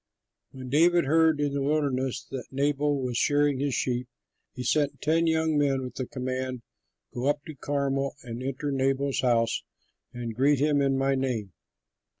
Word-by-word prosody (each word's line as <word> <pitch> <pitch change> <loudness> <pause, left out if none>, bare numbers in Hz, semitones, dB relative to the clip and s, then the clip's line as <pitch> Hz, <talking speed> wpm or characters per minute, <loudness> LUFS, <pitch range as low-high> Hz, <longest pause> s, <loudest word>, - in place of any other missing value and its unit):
When 130 -1 -9
David 170 +4 +4
heard 160 +1 +3
in 145 -1 0
the 140 - -1
wilderness 135 -3 0
that 130 -2 -5
Nabal 145 +1 0
was 125 -2 -1
shearing 145 -2 +2
his 140 -2 0
sheep, 125 0 -1 0.5
he 125 - -5
sent 145 +3 +1
ten 165 +2 +2
young 160 -1 +2
men 135 -2 +1
with 125 - -6
the 130 - -4
command, 130 -1 -4 0.5
"Go 125 +2 -2
up 145 0 0
to 155 - -7
Carmel 140 0 -1
and 120 0 -6
enter 135 +2 -3
Nabal's 135 0 0
house 115 -2 +2 0.5
and 120 -2 -5
greet 140 +5 +3
him 145 +1 +2
in 135 -1 +2
my 135 0 +2
name. 125 -8 -2
135 Hz, 165 wpm, -27 LUFS, 130-145 Hz, 0.5 s, David